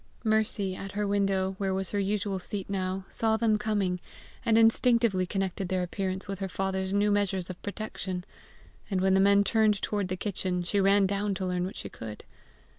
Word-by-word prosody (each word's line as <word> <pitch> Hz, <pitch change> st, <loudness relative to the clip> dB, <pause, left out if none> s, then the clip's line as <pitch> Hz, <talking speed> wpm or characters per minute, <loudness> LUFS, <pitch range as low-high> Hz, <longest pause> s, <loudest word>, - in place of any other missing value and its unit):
Mercy 215 Hz, -3 st, +1 dB
at 195 Hz, +1 st, -7 dB
her 210 Hz, 0 st, -1 dB
window, 195 Hz, -1 st, +1 dB
where 195 Hz, -1 st, 0 dB
was 190 Hz, 0 st, -3 dB
her 205 Hz, -, 0 dB
usual 200 Hz, -1 st, -1 dB
seat 195 Hz, +1 st, -2 dB
now, 190 Hz, -1 st, -2 dB
saw 220 Hz, -1 st, +1 dB
them 220 Hz, -2 st, +2 dB
coming, 200 Hz, -4 st, 0 dB, 0.4 s
and 225 Hz, -1 st, +3 dB
instinctively 225 Hz, -4 st, +4 dB
connected 190 Hz, -1 st, -2 dB
their 185 Hz, -1 st, 0 dB
appearance 190 Hz, +2 st, -3 dB
with 195 Hz, -1 st, -4 dB
her 195 Hz, -, -2 dB
father's 190 Hz, 0 st, -2 dB
new 205 Hz, +1 st, +2 dB
measures 190 Hz, -3 st, 0 dB
of 175 Hz, -, -11 dB
protection; 195 Hz, -3 st, -5 dB, 0.6 s
and 195 Hz, -3 st, 0 dB
when 190 Hz, 0 st, +3 dB
the 190 Hz, -, +5 dB
men 200 Hz, +1 st, +5 dB
turned 215 Hz, 0 st, +3 dB
toward 205 Hz, -2 st, -1 dB
the 185 Hz, 0 st, -3 dB
kitchen, 180 Hz, -2 st, -2 dB
she 200 Hz, +4 st, 0 dB
ran 195 Hz, +1 st, +5 dB
down 200 Hz, +1 st, 0 dB
to 190 Hz, -, -3 dB
learn 180 Hz, -1 st, -1 dB
what 190 Hz, -, -6 dB
she -, -, -5 dB
could. 110 Hz, -2 st, -8 dB
195 Hz, 190 wpm, -28 LUFS, 185-205 Hz, 0.6 s, the